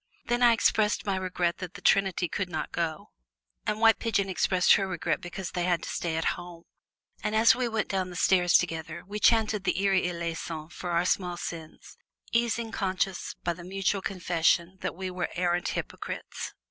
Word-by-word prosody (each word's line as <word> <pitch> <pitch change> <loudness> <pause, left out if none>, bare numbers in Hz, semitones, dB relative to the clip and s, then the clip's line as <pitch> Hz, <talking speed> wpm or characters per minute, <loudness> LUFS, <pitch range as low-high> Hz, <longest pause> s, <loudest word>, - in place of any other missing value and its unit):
Then 240 +1 0
I 240 -1 +7
expressed 215 -1 +2
my 200 -2 0
regret 180 -2 -1
that 185 -1 -7
the - - -8
trinity 190 -2 +3
could 185 +3 -3
not 155 -3 -4
go, 165 -2 -3 0.6
and 210 0 0
White 225 -1 +5
Pigeon 200 -4 0
expressed 185 0 +4
her 195 -2 +2
regret 175 -4 -1
because 175 +1 -6
they 175 -1 -1
had 175 -2 +1
to - - -5
stay 165 -2 -2
at 160 - -1
home. 175 -1 -10 0.6
And 215 - -1
as 220 +1 +6
we 250 -1 0
went 220 -2 -1
down 190 -2 -1
the 180 - -9
stairs 180 -1 +3
together 165 -1 -4
we 205 +3 -5
chanted 220 -3 +3
the 190 - +2
Kyrie 195 -1 +2
eleison 165 -2 -4
for 175 +2 -6
our 170 +1 +1
small 180 -1 0
sins, 165 -2 -8 0.3
easing 235 -1 0
conscience 190 -3 -2
by 175 - 0
the 175 +1 -11
mutual 195 +2 -1
confession 175 -1 +1
that - - -3
we 185 +1 -4
were 180 -1 -2
arrant 175 0 0
hypocrites. - - -5
185 Hz, 185 wpm, -28 LUFS, 175-200 Hz, 0.6 s, I